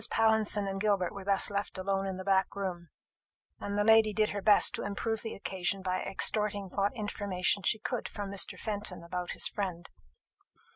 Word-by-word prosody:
Pallinson 220 -2 +2
and 195 0 -4
Gilbert 200 -4 +1
were 200 - -8
thus 195 +1 +3
left 200 -1 -3
alone 195 +1 -1
in 190 -1 -4
the 185 - -6
back 195 0 +1
room, 180 -4 -5 0.7
and 205 0 -4
the 205 - +2
lady 220 -1 +5
did 215 0 +2
her 205 - -4
best 210 +1 +5
to - - -4
improve 220 +2 -2
the 225 - -5
occasion 190 0 -2
by 185 0 -1
extorting 205 0 +1
what 200 +4 0
information 205 -3 -1
she 215 - +2
could 245 +1 -4
from 205 -2 -6
Mr. 200 - +1
Fenton 205 -5 -3
about 180 +1 -4
his - - +1
friend. 180 -4 -4
200 Hz, 185 wpm, -30 LUFS, 190-210 Hz, 0.7 s, lady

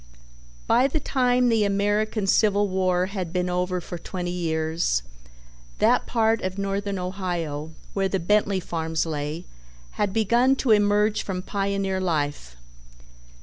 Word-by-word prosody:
By 250 +3 +4
the 295 +3 -1
time 250 -3 +2
the 225 -2 +3
American 205 +1 0
Civil 205 0 +3
War 185 -1 +1
had 190 -3 -4
been 180 0 -1
over 180 0 -1
for 175 0 -7
twenty 175 +1 -4
years, 160 - -1 0.7
that - - +3
part 225 -1 +2
of 185 +1 -3
Northern 200 0 -2
Ohio 175 -5 -4 0.2
where 195 -1 0
the 195 - 0
Bentley 200 +2 +2
farms 160 -2 -2
lay 155 +2 -4 0.5
had 205 -2 -1
begun 235 +5 +3
to 260 -3 0
emerge 210 0 +3
from 185 -2 -4
pioneer 195 -1 -1
life. 145 - -2
190 Hz, 135 wpm, -24 LUFS, 175-210 Hz, 0.7 s, By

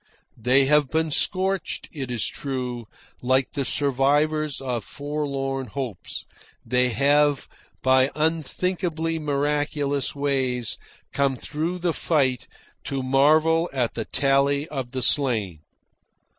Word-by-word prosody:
They 130 +4 +3
have 145 -1 +3
been 160 +1 0
scorched, 190 +4 0
it 135 -5 -5
is 120 -3 -1
true; 125 -4 -4 0.3
like 130 +1 +1
the 140 - -2
survivors 145 +3 +1
of 125 -4 -3
forlorn 140 -2 -3
hopes, 120 -5 -6 0.4
they 125 +1 +2
have 145 +3 +2 0.4
by 130 0 +4
unthinkably 165 +1 -1
miraculous 145 -1 -1
ways 130 -4 -1 0.3
come 140 -1 +1
through 160 +7 -3
the 175 -1 0
fight 135 -8 0 0.4
to 135 -1 -2
marvel 155 +5 +3
at 125 -4 -1
the 115 - -4
tally 140 +1 +2
of 135 -4 -4
the 130 0 -3
slain. 115 - +2
140 Hz, 115 wpm, -24 LUFS, 130-150 Hz, 0.4 s, by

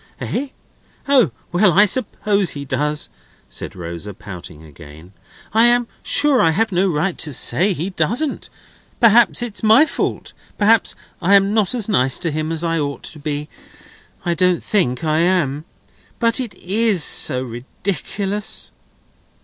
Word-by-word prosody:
"Eh? 280 - -3 0.6
O, 265 - +4 0.2
well, 180 0 +3
I 205 +5 +6
suppose 205 -4 -1
he 140 -1 -5
does," 150 +3 -2 0.4
said - - -6
Rosa, 85 +3 -7
pouting 90 -7 -10
again; 80 +3 -14 0.4
"I 225 +2 +5
am 240 0 +3
sure 285 -3 +3
I 165 - +4
have 220 +7 0
no 185 +2 +2
right 170 +3 -1
to 155 - -2
say 175 - +1
he 175 +4 -4
doesn't. 230 - -2 0.5
Perhaps 235 +1 +5
it's 230 -4 -6
my 220 +7 +6
fault. - - -4 0.2
Perhaps 215 +1 +3 0.3
I 195 +4 +4
am 200 +1 +3
not 215 0 +1
as 230 -5 0
nice 130 - +2
to 170 -3 -3
him 155 +1 -3
as 165 0 -2
I 165 -1 0
ought 140 -1 -4
to 155 - -6
be. 150 0 -4 0.8
I 175 - +1
don't 180 0 +1
think 165 -10 0
I 155 0 +1
am. 165 -5 +1 0.5
But 230 +1 +2
it 245 -5 -5
is 200 -2 +1
so 130 -3 +3
ridiculous!" 195 - -3
175 Hz, 150 wpm, -19 LUFS, 145-215 Hz, 0.8 s, I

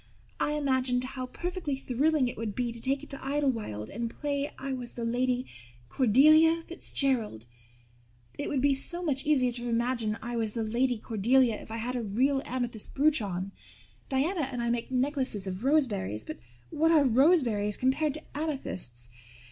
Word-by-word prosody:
I 295 - +1
imagined 260 -4 +1
how 255 0 -5
perfectly 350 -1 -3
thrilling 275 +2 +1
it 245 - -4
would 215 -3 -4
be 245 -2 -1
to 230 0 -7
take 270 +3 -1
it - - -11
to 275 - -5
Idlewild 255 - -2
and 230 +2 -3
play 285 +2 -3
I 270 0 -4
was 245 -2 -6
the 235 - -4
Lady 250 +2 0 0.4
Cordelia 310 +7 +5
Fitzgerald. 255 - -2 0.9
It - - -4
would 275 -3 0
be 280 0 +4
so 345 +6 0
much 285 -4 -1
easier 260 -5 +3
to 240 0 -4
imagine 235 -2 0
I 240 0 -4
was 220 -2 0
the 230 - -2
Lady 240 +3 +1
Cordelia 230 +3 +2
if - - -13
I 225 - -4
had 245 +3 -3
a 245 - -1
real 255 +6 +1
amethyst 240 -4 -3
brooch 295 -1 +4
on. 190 -1 -4 0.6
Diana 285 +2 0
and 245 - -4
I 235 - +1
make 235 -1 -2
necklaces 260 -5 0
of 190 +3 -4
roseberries 220 - +1
but 155 - -7 0.3
what 320 +2 +2
are 315 -3 +5
roseberries 245 - +3
compared 275 +3 +1
to 310 - -7
amethysts? 260 - -4
255 Hz, 170 wpm, -29 LUFS, 230-280 Hz, 0.9 s, Cordelia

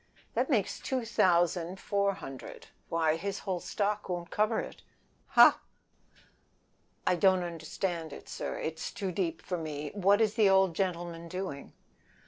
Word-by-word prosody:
"That - - 0
makes - - +1
two 255 -3 -2
thousand 175 -3 +2
four 200 -1 +1
hundred; 135 -8 -9 0.2
why, 160 -1 +2
his 200 +4 -3
whole 185 -3 -1
stock 205 +3 -2
won't 175 0 -4
cover 215 0 +2
it." - - -7 0.6
"No!" - - +10 1.5
"Don't 185 0 +4
understand 165 0 -4
it, - - -9
it 160 0 -3
is - - -4
too 195 -2 -3
deep 170 -3 -2
for 180 -2 -3
me. 150 -2 -5
What 200 +1 +4
is 215 -2 +3
the 215 -4 +4
old 190 -3 +4
gentleman 170 -3 -2
doing?" 180 -5 -5
180 Hz, 140 wpm, -30 LUFS, 165-200 Hz, 1.5 s, No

